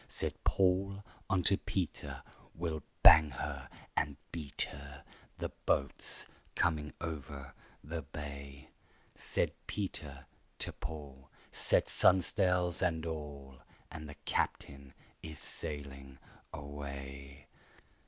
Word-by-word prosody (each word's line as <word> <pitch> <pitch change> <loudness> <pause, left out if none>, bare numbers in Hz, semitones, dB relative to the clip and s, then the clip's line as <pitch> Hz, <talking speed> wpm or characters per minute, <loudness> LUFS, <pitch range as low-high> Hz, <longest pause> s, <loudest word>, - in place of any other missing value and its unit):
Said - - -2
Paul 95 +1 +3 0.3
unto 95 +1 +4
Peter, 95 -5 -3 0.3
"We'll 80 -2 -2 0.2
bang 80 0 +11
her 65 - -4 0.3
and 70 -1 +1
beat 75 -5 -2
her! 70 +1 -9 0.3
The - - -2 0.2
boat's 70 - +2 0.3
coming 75 -3 +2
over 70 -5 -5 0.3
the 80 +2 -3
bay." 70 -1 -7 0.4
Said - - +1 0.2
Peter 75 -9 -3 0.3
to - - 0
Paul, 70 -4 -7 0.2
"Set - - +4
stun'sles 90 -1 +4
and 85 -3 +2
all, 70 -4 -5 0.3
And 80 -1 -6
the 75 - -8
captain 70 -1 -1 0.3
is 80 -2 -7
sailing 70 -4 -4 0.3
away." 70 -2 -7
75 Hz, 100 wpm, -34 LUFS, 70-85 Hz, 0.4 s, bang